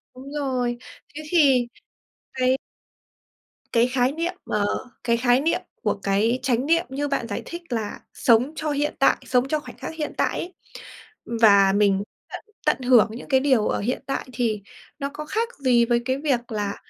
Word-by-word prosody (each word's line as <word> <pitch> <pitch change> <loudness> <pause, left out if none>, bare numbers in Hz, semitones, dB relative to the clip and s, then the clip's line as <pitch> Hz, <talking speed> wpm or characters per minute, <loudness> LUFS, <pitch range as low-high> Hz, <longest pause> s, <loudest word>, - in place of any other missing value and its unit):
đúng 270 +2 -10
rồi. 255 -4 -1 0.4
Thế 310 - -6
thì 270 -8 +4 0.7
cái 255 0 +2 1.2
cái 235 +1 +4
khái 250 0 +1
niệm 335 +4 -2
ờ, 210 -1 0 0.4
cái 235 -1 +2
khái 245 +2 +3
niệm 325 - +1 0.2
của - - +2
cái 215 +5 +1
chánh 255 -1 +1
niệm 335 +3 +3
như 285 +2 -2
bạn 275 -4 -2
giải 205 - -4
thích 340 +1 -7
là 220 -4 -3
sống 245 +4 +3
cho 310 -1 -3
hiện 290 +1 0
tại, 275 - +4
sống 250 +1 +2
cho 305 +1 0
khoảnh - - -12
khắc - - -6
hiện 300 -2 -4
tại - - 0
ấy. 360 - -6 0.9
Và 200 -3 +6
mình 200 -1 +3 0.3
tận - - -7 0.2
tận - - +2
hưởng 245 -4 +5
những 230 - -9
cái 265 - +4
điều 260 -6 +2
ở - - 0
hiện 245 +6 -2
tại 275 - -3
thì 220 -3 -1 0.4
nó 280 0 -2
có 305 - -6
khác 455 +8 -1
gì 245 -3 +4
với 240 0 +1
cái 260 +1 0
việc 260 -5 -1
là 205 -2 -2
255 Hz, 185 wpm, -24 LUFS, 235-285 Hz, 1.2 s, Và